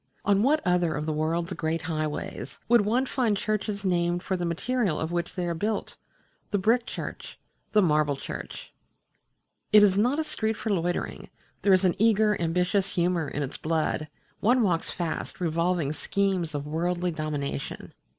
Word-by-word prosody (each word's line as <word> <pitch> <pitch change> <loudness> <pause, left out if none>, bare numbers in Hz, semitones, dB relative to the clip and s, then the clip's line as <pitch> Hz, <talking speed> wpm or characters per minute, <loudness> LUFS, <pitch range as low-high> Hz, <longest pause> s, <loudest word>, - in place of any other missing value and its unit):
On 200 0 +4
what 300 +6 +2
other 175 -2 +2
of 150 - -3
the 155 - -1
world's 165 +4 -1
great 165 0 -2
highways 155 +2 -4
would 240 -1 +6
one 235 +6 +1
find 240 -6 +1
churches 210 -1 -2
named 175 -1 +1
for 190 - -1
the 175 -1 -2
material 200 +1 0
of 160 +1 -2
which 175 0 -2
they 180 -2 -1
are 170 - -1
built? 210 +6 -2 0.5
the 205 - +1
Brick 230 +5 +2
Church, - - -6 0.4
the 210 -1 +5
Marble 150 -3 +2
Church! - - -7 1.0
It 210 0 +8
is 200 -1 +4
not 250 +7 +2
a 320 - +1
street 220 -7 -2
for 220 - -2
loitering 175 -2 -2 0.3
there 200 - +3
is 190 0 +5
an 180 - +4
eager, 215 -1 +4
ambitious 180 +4 +1
humour 175 -2 +1
in 145 +1 -3
its 140 - -5
blood; 155 -1 -1 0.3
one 245 +2 +3
walks 175 -5 +1
fast, 170 -3 -4
revolving 170 -2 0
schemes 185 -3 -1
of 145 0 -3
worldly 175 +3 -1
dominion. 150 -3 -4
180 Hz, 170 wpm, -27 LUFS, 160-210 Hz, 1.0 s, It